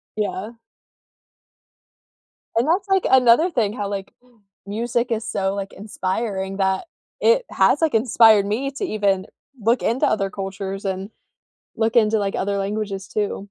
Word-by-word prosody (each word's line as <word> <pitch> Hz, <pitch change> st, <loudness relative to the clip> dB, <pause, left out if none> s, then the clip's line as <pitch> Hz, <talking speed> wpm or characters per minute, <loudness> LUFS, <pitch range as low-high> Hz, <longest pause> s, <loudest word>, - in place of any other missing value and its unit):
Yeah. 210 Hz, 0 st, -3 dB, 2.1 s
And 240 Hz, +6 st, +2 dB
that's 380 Hz, +5 st, +1 dB
like 385 Hz, -1 st, +2 dB
another 260 Hz, +6 st, +5 dB
thing 220 Hz, -, 0 dB
how, 205 Hz, -4 st, -4 dB
like, 195 Hz, -1 st, -5 dB, 0.5 s
music 235 Hz, +3 st, -1 dB
is 225 Hz, 0 st, -1 dB
so, 195 Hz, 0 st, -1 dB
like, 200 Hz, -1 st, -5 dB
inspiring 195 Hz, -1 st, -3 dB
that 190 Hz, -, 0 dB, 0.3 s
it 485 Hz, +1 st, +3 dB
has, 295 Hz, -, +3 dB
like, 315 Hz, -6 st, +2 dB
inspired 220 Hz, -3 st, +5 dB
me 255 Hz, +7 st, -2 dB
to 280 Hz, +9 st, -4 dB
even 200 Hz, -, 0 dB, 0.3 s
look 230 Hz, +4 st, +2 dB
into 235 Hz, +4 st, +1 dB
other 195 Hz, -2 st, +1 dB
cultures 195 Hz, 0 st, -5 dB
and 190 Hz, +1 st, -3 dB, 0.7 s
look 220 Hz, 0 st, 0 dB
into, 220 Hz, -1 st, +4 dB
like, 200 Hz, -1 st, -2 dB
other 200 Hz, +1 st, -1 dB
languages 200 Hz, -1 st, -3 dB
too. 205 Hz, -2 st, -2 dB
210 Hz, 140 wpm, -22 LUFS, 195-235 Hz, 2.1 s, another